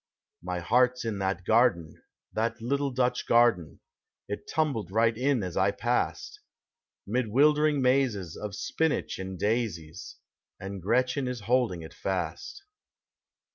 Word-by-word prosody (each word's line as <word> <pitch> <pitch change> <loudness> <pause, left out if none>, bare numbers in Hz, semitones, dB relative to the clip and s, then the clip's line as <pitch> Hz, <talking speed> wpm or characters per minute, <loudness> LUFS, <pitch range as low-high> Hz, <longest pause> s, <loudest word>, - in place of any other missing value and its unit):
My 90 +1 -4
heart 125 +6 +3
's - - -6
in 110 -3 -2
that 95 -1 -2
garden, 110 -9 +2 0.3
that 115 +1 -1
little 140 +4 -1
Dutch 125 -1 -1
garden 115 -10 +3 0.5
It 105 - -6
tumbled 145 - -1
right 115 +3 +2
in 130 -1 +1
as 90 -2 -5
I - - +3
passed, - - -2 0.7
Mid 120 +3 -1
wildering 150 +4 +3
mazes 125 -10 +1
of 105 -1 -6
spinach 160 +2 -1
and 95 0 -5
daisies. 95 -7 -2 0.4
And 95 0 -6
Gretchen 125 - +1
is 125 -2 -4
holding 115 -6 +1
it 80 - -10
fast. 95 - -4
115 Hz, 135 wpm, -28 LUFS, 95-125 Hz, 0.7 s, heart